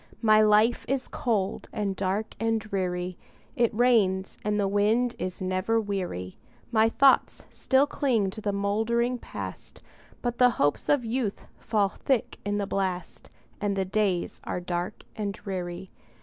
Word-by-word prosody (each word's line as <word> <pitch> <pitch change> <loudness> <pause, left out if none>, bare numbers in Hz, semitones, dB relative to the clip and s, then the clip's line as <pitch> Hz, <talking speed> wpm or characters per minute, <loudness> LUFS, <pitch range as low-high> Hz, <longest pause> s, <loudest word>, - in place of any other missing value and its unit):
My 215 -1 +6
life 215 +2 +4
is 265 0 -1
cold, 220 -9 -1
and 200 -2 -2
dark, 195 +3 -2
and 225 0 +1
dreary; 185 -4 -3 0.4
It 235 -1 +2
rains, 215 -5 +2
and 210 0 0
the 200 - +2
wind 215 +5 +2
is 185 0 -4
never 185 +5 +1
weary; 185 - -4 0.3
My 220 -1 +4
thoughts 270 +3 +3
still 265 +1 +3
cling 235 -9 0
to 215 - -8
the 205 - 0
moldering 225 +5 0
Past, - - -8 0.4
But 240 -1 -2
the 250 -1 +7
hopes 145 0 +1
of 280 -5 +3
youth 225 -3 -2
fall 210 -3 +1
thick 255 +3 -1
in 205 0 -1
the 205 - -1
blast, 185 -3 -3 0.3
And 205 -1 0
the 190 -1 0
days 190 -2 -1
are - - -3
dark 180 +3 -4
and 205 -2 -2
dreary. 180 -1 -5
205 Hz, 150 wpm, -27 LUFS, 190-230 Hz, 0.4 s, the